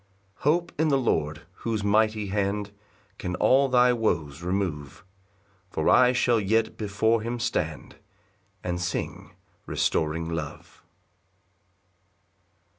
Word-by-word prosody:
6 -, -, -21 dB
Hope 170 Hz, +3 st, +2 dB
in 160 Hz, -, +3 dB
the 140 Hz, -2 st, +3 dB
Lord, 75 Hz, -, -1 dB, 0.2 s
whose 110 Hz, -3 st, -2 dB
mighty 105 Hz, 0 st, +2 dB
hand 100 Hz, +1 st, -1 dB, 0.5 s
Can 90 Hz, -1 st, -3 dB
all 135 Hz, +6 st, +4 dB
thy 125 Hz, 0 st, +5 dB
woes 85 Hz, -, -1 dB
remove; 90 Hz, -6 st, -3 dB, 0.7 s
For 80 Hz, -3 st, 0 dB
I 125 Hz, -1 st, +6 dB
shall 120 Hz, -2 st, +2 dB
yet 110 Hz, +2 st, +1 dB
before 110 Hz, +2 st, +1 dB
him 120 Hz, +2 st, -3 dB
stand, 120 Hz, -, -3 dB, 0.7 s
And 90 Hz, -1 st, -2 dB
sing 85 Hz, -, -4 dB, 0.3 s
restoring 80 Hz, +1 st, 0 dB
love. 80 Hz, -3 st, -6 dB
105 Hz, 115 wpm, -26 LUFS, 85-120 Hz, 0.7 s, I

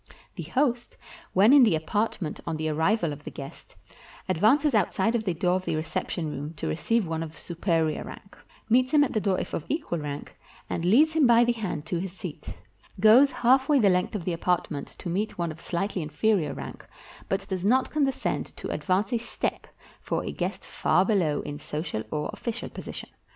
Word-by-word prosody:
The -, -, -5 dB
host, 250 Hz, -3 st, -1 dB, 0.4 s
when 205 Hz, +7 st, +6 dB
in 285 Hz, -, +8 dB
the 215 Hz, -9 st, +5 dB
apartment 175 Hz, 0 st, -2 dB
on 165 Hz, -2 st, -2 dB
the 155 Hz, 0 st, -1 dB
arrival 160 Hz, +2 st, +1 dB
of 145 Hz, +1 st, -11 dB
the -, -, -6 dB
guest, 140 Hz, -1 st, -10 dB, 0.5 s
advances 225 Hz, -, +3 dB
outside 215 Hz, 0 st, +2 dB
of 225 Hz, -2 st, -1 dB
the 180 Hz, -4 st, 0 dB
door 180 Hz, +2 st, +2 dB
of 185 Hz, -, -7 dB
the -, -, -1 dB
reception 165 Hz, +1 st, -3 dB
room 145 Hz, +3 st, -5 dB
to -, -, -6 dB
receive 205 Hz, -, 0 dB
one 160 Hz, 0 st, -2 dB
of 160 Hz, -1 st, -7 dB
superior 165 Hz, -2 st, -1 dB
rank; 195 Hz, -, -11 dB, 0.3 s
meets 255 Hz, +3 st, +3 dB
him 295 Hz, -, +7 dB
at 280 Hz, -, -1 dB
the 215 Hz, -, +1 dB
door 195 Hz, -2 st, +1 dB
if -, -, -5 dB
of 160 Hz, -, -2 dB
equal 295 Hz, -, -2 dB
rank, 145 Hz, -1 st, -6 dB, 0.3 s
and 165 Hz, -, -3 dB
leads 275 Hz, -, +5 dB
him 310 Hz, -5 st, +4 dB
by 235 Hz, 0 st, +6 dB
the 240 Hz, -, +3 dB
hand 200 Hz, -10 st, -4 dB
to 170 Hz, +1 st, -2 dB
his 185 Hz, 0 st, -5 dB
seat; 195 Hz, -, -8 dB, 0.4 s
goes 225 Hz, +7 st, +7 dB
halfway 265 Hz, +4 st, +3 dB
the 205 Hz, -7 st, +5 dB
length 180 Hz, +4 st, 0 dB
of 185 Hz, -5 st, -4 dB
the 180 Hz, -, 0 dB
apart 175 Hz, +1 st, 0 dB
ment 145 Hz, -2 st, -4 dB
to -, -, -8 dB
meet 200 Hz, +6 st, -2 dB
one 170 Hz, -2 st, -1 dB
of 155 Hz, -, -11 dB
slightly 185 Hz, +1 st, -2 dB
inferior 155 Hz, 0 st, 0 dB
rank, -, -, -8 dB, 0.5 s
but 195 Hz, 0 st, -1 dB
does 185 Hz, -2 st, -3 dB
not 255 Hz, +6 st, +2 dB
condescend 280 Hz, -3 st, 0 dB
to -, -, -6 dB
advance 195 Hz, +6 st, 0 dB
a 235 Hz, -, +2 dB
step 235 Hz, -, -4 dB, 0.3 s
for -, -, -2 dB
a -, -, -3 dB
guest -, -, -4 dB
far 185 Hz, -, +2 dB
below 175 Hz, -9 st, +1 dB
in 145 Hz, 0 st, -6 dB
social 150 Hz, -7 st, -4 dB
or 150 Hz, -1 st, -2 dB
official 235 Hz, 0 st, -5 dB
position. -, -, -8 dB
190 Hz, 200 wpm, -27 LUFS, 160-230 Hz, 0.5 s, in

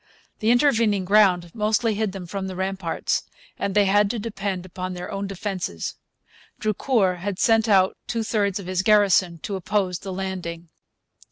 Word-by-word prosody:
The 220 Hz, -, +1 dB
intervening 230 Hz, -6 st, +3 dB
ground 180 Hz, -4 st, +3 dB
mostly 220 Hz, +1 st, +1 dB
hid 210 Hz, -1 st, -1 dB
them 190 Hz, -2 st, -7 dB
from 190 Hz, +2 st, -4 dB
the 190 Hz, -, -6 dB
ramparts, 190 Hz, -2 st, -1 dB, 0.4 s
and 200 Hz, 0 st, -2 dB
they 205 Hz, -1 st, +5 dB
had 205 Hz, +1 st, +3 dB
to 235 Hz, -, -2 dB
depend 200 Hz, -4 st, -4 dB
upon 185 Hz, 0 st, -5 dB
their 180 Hz, 0 st, -6 dB
own 200 Hz, 0 st, -3 dB
defences. 190 Hz, -, -4 dB, 0.7 s
Drucour 215 Hz, -3 st, +1 dB
had 190 Hz, +1 st, -4 dB
sent 225 Hz, +1 st, +3 dB
out 190 Hz, -2 st, +4 dB
two 230 Hz, -1 st, -1 dB
thirds 205 Hz, -3 st, 0 dB
of 195 Hz, -, -8 dB
his 185 Hz, 0 st, 0 dB
garrison 195 Hz, -4 st, +4 dB
to 200 Hz, -, -3 dB
oppose 190 Hz, -1 st, -1 dB
the 195 Hz, -, -7 dB
landing. 180 Hz, -3 st, -5 dB
195 Hz, 165 wpm, -24 LUFS, 185-210 Hz, 0.7 s, they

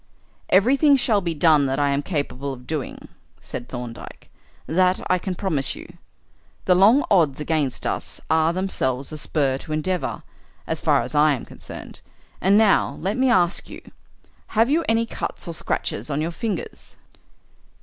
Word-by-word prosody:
"Everything 275 Hz, +9 st, +5 dB
shall 245 Hz, -6 st, +2 dB
be 170 Hz, -3 st, -2 dB
done 150 Hz, -2 st, +4 dB
that 135 Hz, 0 st, -1 dB
I 145 Hz, -1 st, +2 dB
am 140 Hz, +1 st, 0 dB
capable 140 Hz, -4 st, -3 dB
of 125 Hz, -1 st, -12 dB
doing," 150 Hz, -1 st, -5 dB, 0.3 s
said 120 Hz, -, -8 dB
Thorndyke; 120 Hz, -2 st, -8 dB, 0.3 s
"that 185 Hz, +2 st, +2 dB
I 185 Hz, -, +3 dB
can 185 Hz, 0 st, -4 dB
promise 160 Hz, -9 st, -1 dB
you. -, -, -10 dB, 0.8 s
The 180 Hz, -, +5 dB
long 210 Hz, +10 st, +5 dB
odds 160 Hz, -9 st, +3 dB
against 150 Hz, -3 st, -1 dB
us -, -, -3 dB
are 160 Hz, 0 st, +3 dB
themselves 140 Hz, -8 st, -1 dB
a 155 Hz, -, -6 dB
spur 135 Hz, -4 st, 0 dB
to 155 Hz, -, -6 dB
endeavour, 175 Hz, +4 st, -2 dB, 0.4 s
as -, -, -2 dB
far -, -, +3 dB
as 125 Hz, -, -6 dB
I 150 Hz, 0 st, +4 dB
am 125 Hz, -, -5 dB
concerned. -, -, -10 dB, 0.4 s
And 195 Hz, +2 st, +4 dB
now, 215 Hz, -2 st, +3 dB
let 195 Hz, +4 st, -1 dB
me 260 Hz, +1 st, +2 dB
ask 180 Hz, -6 st, +2 dB
you, -, -, -9 dB, 0.8 s
have 230 Hz, +4 st, +4 dB
you 330 Hz, +3 st, +2 dB
any 225 Hz, +1 st, +2 dB
cuts 230 Hz, -, -5 dB
or 170 Hz, -, -4 dB
scratches 155 Hz, -, -3 dB
on 145 Hz, 0 st, -1 dB
your 160 Hz, +2 st, -1 dB
fingers?" 200 Hz, 0 st, -5 dB
165 Hz, 165 wpm, -23 LUFS, 140-195 Hz, 0.8 s, Everything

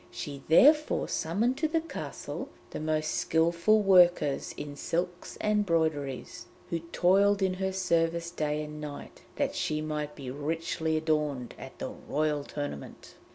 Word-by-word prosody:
She 140 Hz, -2 st, -6 dB
therefore 300 Hz, -, +5 dB
summoned 220 Hz, +11 st, 0 dB
to 315 Hz, -, +2 dB
the 325 Hz, +1 st, +1 dB
castle 330 Hz, -, -6 dB, 0.2 s
the -, -, -5 dB
most 155 Hz, 0 st, 0 dB
skilful 170 Hz, +6 st, +2 dB
workers 175 Hz, -7 st, +4 dB
in 145 Hz, -1 st, -6 dB
silks 175 Hz, +4 st, -3 dB
and 210 Hz, 0 st, +2 dB
broideries, 150 Hz, -, -1 dB, 0.2 s
who 170 Hz, -, 0 dB
toiled 200 Hz, +2 st, +4 dB
in 190 Hz, -1 st, +2 dB
her 190 Hz, +1 st, -2 dB
service 170 Hz, -2 st, 0 dB
day 150 Hz, -3 st, -1 dB
and 150 Hz, 0 st, -8 dB
night, 145 Hz, -1 st, -8 dB
that -, -, 0 dB
she 155 Hz, -1 st, -1 dB
might 150 Hz, -1 st, -3 dB
be 135 Hz, -3 st, -6 dB
richly 160 Hz, +2 st, -1 dB
adorned 150 Hz, -5 st, -1 dB
at -, -, -10 dB
the -, -, -4 dB
Royal 150 Hz, -1 st, -1 dB
Tournament. 145 Hz, -, -7 dB
160 Hz, 145 wpm, -29 LUFS, 150-185 Hz, 0.2 s, therefore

